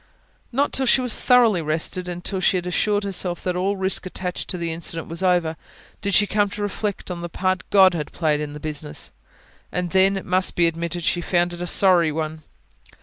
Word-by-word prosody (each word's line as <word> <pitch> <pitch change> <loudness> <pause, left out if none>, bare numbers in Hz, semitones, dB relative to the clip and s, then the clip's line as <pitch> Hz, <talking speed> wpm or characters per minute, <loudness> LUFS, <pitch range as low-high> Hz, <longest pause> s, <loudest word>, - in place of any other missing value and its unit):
Not 275 +4 0
till 265 -1 +1
she 250 - +5
was 250 -3 0
thoroughly 235 -8 +4
rested, 160 +4 -1
and 175 0 -6
till 195 - -1
she 185 - +2
had 180 - -4
assured 205 +3 +1
herself 185 -3 -3
that 180 -1 -1
all 195 +3 0
risk 190 0 -1
attaching 180 -1 -4
to 180 - -3
the 170 -1 -2
incident 165 0 -3
was 165 +2 -5
over, 175 -3 +2 0.5
did 200 -1 +1
she 210 - +6
come 205 0 +1
to 205 - -5
reflect 205 -1 -3
on 175 -1 -5
the 175 - -5
part 185 +2 -1
God 190 -2 +6
had 150 -3 -4
played 155 -3 0
in 150 -1 -5
the 150 - -8
business. 150 -1 -3 0.6
And 180 -1 -2
then, 190 +1 +4
it 195 - -6
must 185 0 +1
be 175 - +4
admitted, 170 +1 -2
she 175 - +1
found 175 0 +1
it 175 - -7
a 175 - -3
sorry 175 -3 +4
one. 155 0 -4
180 Hz, 215 wpm, -22 LUFS, 170-195 Hz, 0.6 s, she